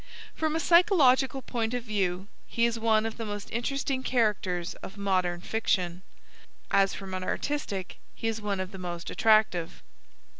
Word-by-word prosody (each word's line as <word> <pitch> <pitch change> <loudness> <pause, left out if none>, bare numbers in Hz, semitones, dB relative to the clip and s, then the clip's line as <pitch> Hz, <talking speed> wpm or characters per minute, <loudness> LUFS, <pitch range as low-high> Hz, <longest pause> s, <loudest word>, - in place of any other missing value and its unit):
From 315 -1 -1
a - - +1
psychological 285 -8 +4
point 230 -1 -2
of 245 - -3
view 195 -4 -1 0.2
he 235 - +1
is 235 -1 0
one 220 -1 +3
of 225 - -4
the 230 - -4
most 205 -1 -6
interesting 265 +2 -1
characters 210 -9 0
of 195 - -9
modem 185 -3 0
fiction, 180 -5 -1 0.7
as 195 0 +3
from 195 -1 -7
an 185 0 -3
artistic 200 -6 -3 0.2
he 225 - -3
is 225 -1 -2
one 200 -2 -2
of 185 0 -4
the 190 - -9
most 175 -2 -5
attractive. 215 -6 +2
215 Hz, 160 wpm, -28 LUFS, 185-245 Hz, 0.7 s, psychological